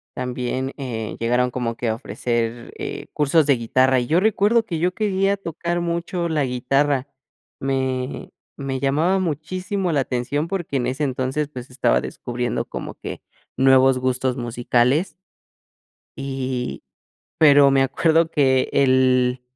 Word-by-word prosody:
también, 125 +1 -3
eh, 115 -5 -4
llegaron 125 +2 +1
como 120 -2 -2
que 115 -1 -2
a 110 - 0
ofrecer, 120 0 -3
eh, - - -5
cursos 150 +1 +3
de 140 -4 +3
guitarra, 130 +3 +2
y 120 - -3
yo 165 +3 +3
recuerdo 220 +2 +3
que 165 -6 -3
yo 180 +2 +1
quería 200 -2 +1
tocar 170 -1 -3
mucho 170 +1 -2
la 150 -3 +1
guitarra. 135 +2 0 0.5
Me 130 -1 -2 0.3
me 135 -2 -3
llamaba 155 +8 +2
muchísimo 185 +3 -2
la 145 - +2
atención 135 +5 -1
porque 170 -7 -2
en 120 -1 -1
ese 135 +4 -2
entonces, 135 +2 -1
pues, 125 -2 -9
estaba 125 - +2
descubriendo 120 -1 -3
como - - -7
que - - -7 0.4
nuevos 130 -1 +5
gustos 130 0 0
musicales. 120 +6 +1 1.0
Y, 130 -2 -4 0.6
pero 145 -3 +7
me 135 0 +3
acuerdo 165 +4 +2
que 135 -5 +2
el 130 -1 +3
135 Hz, 140 wpm, -22 LUFS, 125-160 Hz, 1.0 s, pero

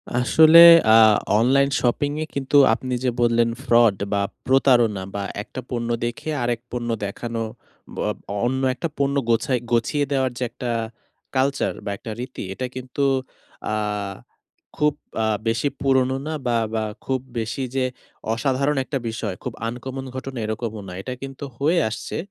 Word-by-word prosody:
আসলে 160 +7 +7 0.3
আ 110 - +8 0.4
online 140 +4 +3
shopping 135 +4 +1
এ - - -4
কিন্তু 140 +1 +1 0.2
আপনি 130 +2 -3
যে, 130 - +2
বললেন 115 0 +3
ফ্রড 115 -6 +4 0.2
বা 100 - +1 0.2
প্রতারণা 120 -7 +3
বা 100 - -2 0.2
একটা 130 - -8
পণ্য 120 -1 -3 0.2
দেখে 120 +6 -4
আরেক 120 -1 0
পণ্য 120 -1 -3 0.2
দেখানো। 115 +3 -4 0.5
ব - - -10
অব - - -3 0.3
অন্য 130 +2 0
একটা 165 - -3
পণ্য 140 0 +1
গোছায় 115 +2 +2
গছিয়ে 120 +5 +1
দেওয়ার 130 -2 +1
যে, 125 - -2
একটা 120 +1 -6 0.7
কালচার 135 +1 +1
বা - - -2
একটা 115 0 -8
রীতি 125 +1 -6
এটা 130 - -4
কিন্তু 130 +2 -4 0.7
আ - - 0 1.0
খুব 150 0 +2 0.3
আ - - +2 0.2
বেশি 115 +5 +1
পুরোনো 130 -1 +2
না 160 - -2
বা 120 -1 +2 0.2
বা 110 -1 0 0.2
খুব 130 -1 0 0.2
বেশি 115 +4 -3
যে, 130 -1 +2 0.5
অসাধারণ 135 +5 0
একটা 135 +1 -3
বিষয় 110 -4 -4
খুব - - -4
আনকমন 130 +3 -6
ঘটনা 130 0 -6
এরকমও 110 0 -4
না। 90 - -7
এটা 130 - -5
কিন্তু 135 0 -8
হয়ে 160 +6 +2
আসছে। 110 - -5
125 Hz, 155 wpm, -22 LUFS, 115-135 Hz, 1.0 s, আ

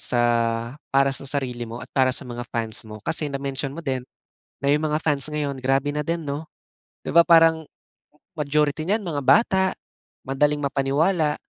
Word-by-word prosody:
sa 120 - 0 0.7
para 135 0 +4
sa - - -7
sarili 125 -4 -3
mo 115 +2 -7
at - - -10
para 130 -1 +4
sa - - -4
mga 120 0 -5
fans 115 0 -3
mo 110 0 -9
kasi 155 -2 -1
na-mention 140 -1 -4
mo 165 - -7
din, 130 -3 -2 0.6
na 140 - 0
yung 150 +1 +1
mga 155 0 0
fans 145 -4 +1
ngayon 150 -2 -2
grabe 135 +2 +1
na 150 - -2
din, 165 +1 -2
'no? 145 +2 -4 0.6
'Di - - -1
ba 170 - +9
parang 165 -1 +6 0.7
majority 150 +1 +1
niyan 210 +2 +1
mga 150 -5 -2
bata, 190 - +4 0.6
madaling 145 +2 +2
mapaniwala 150 +4 +1
145 Hz, 170 wpm, -23 LUFS, 135-155 Hz, 0.7 s, ba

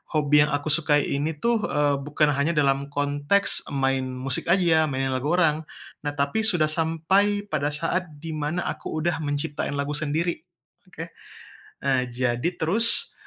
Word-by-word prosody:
hobi 150 -1 +3
yang 150 - -5
aku 145 +1 -1
sukai 150 -2 +3
ini 150 +3 -2
tuh, 235 +9 0
eee, 145 -1 +1
bukan 150 +1 0
hanya 145 +4 0
dalam 140 -1 +1
konteks 145 +6 +2
main 135 -1 0
musik 130 +1 -3
aja 180 +2 +3
ya, 160 -2 +4
mainin 135 -1 -2
lagu 130 +2 -2
orang. 160 -3 +1 0.4
Nah 145 - -2
tapi 140 +8 -1
sudah 165 -7 +2
sampai 180 +6 +1
pada 145 - 0
saat 170 +4 -1 0.2
di 165 - -5
mana 155 +3 -3
aku - - -5
udah 170 -1 0
menciptain 145 -1 -3
lagu 140 +1 -2
sendiri, 155 +3 -1 0.5
oke. 165 -2 -9 0.7
E 140 - 0 0.2
jadi 120 +5 -1
terus, 215 +9 +4
150 Hz, 160 wpm, -24 LUFS, 140-165 Hz, 0.7 s, ya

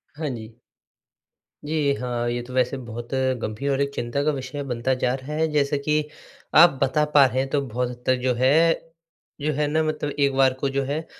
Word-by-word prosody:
हाँ 155 -1 -3
जी। 110 0 -10 1.1
जी, 150 -2 +1
हाँ, 120 -2 -2
ये 120 0 -2
तो 125 +1 -10
वैसे 130 +1 +1
बहुत 120 0 -8 0.3
गंभीर 125 +7 -2
और 135 +1 0
एक 140 0 -1
चिंता 130 +4 -2
का 155 - +2
विषय 140 +1 -5
बनता 125 0 -1
जा 125 0 +2
रहा 135 +3 -7
है 160 +1 +1
जैसे 145 -1 +1
कि 150 +2 0 0.5
आप 165 -4 +7
बता 150 +3 +2
पा 140 -2 +8
रहे 130 0 0
हैं 135 0 -1
तो 145 0 +1
बहुत 125 +2 -2
हद 125 0 -10
तक 130 - +3
जो 130 -1 +2
है 130 +2 +3 0.9
जो 155 +1 0
है 150 +1 0
ना 155 +2 +1
मतलब 155 -2 -2
एक 140 -1 +3
बार 135 -1 +4
को 140 - +1
जो 135 0 -1
है, 150 +4 -3
135 Hz, 215 wpm, -24 LUFS, 125-145 Hz, 1.1 s, पा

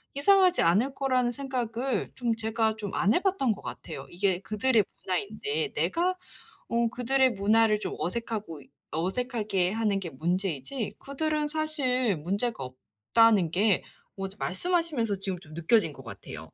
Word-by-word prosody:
이상하지 370 +4 +5
않을 215 +11 +3
거라는 255 -3 +1
생각을 255 -1 -2
좀 235 -3 0
제가 220 0 0
좀 205 -3 -5
안 200 +5 +3
해봤던 360 - +2
것 - - -12
같아요. - - -7
이게 185 0 0
그들의 215 +2 +2 0.2
문화인데 185 -5 -2
내가 340 - +1 0.5
어 235 0 +2
그들의 260 +2 +2
문화를 215 +1 +3
좀 - - -3
어색하고 200 - -4 0.3
어색하게 195 0 0
하는 215 -3 +1
게 180 - -5
문제이지 180 - -2
그들은 300 +2 -1
사실 275 - 0
문제가 195 - -2
없다는 130 - +2
게 195 +3 +2 0.3
어 195 -1 -3
말씀하시면서 285 - 0
지금 190 -2 -3
좀 155 -4 -13
느껴진 170 +1 +2
것 135 -2 -13
같아요. 100 -8 -9
220 Hz, 315 characters per minute, -28 LUFS, 185-255 Hz, 0.5 s, 이상하지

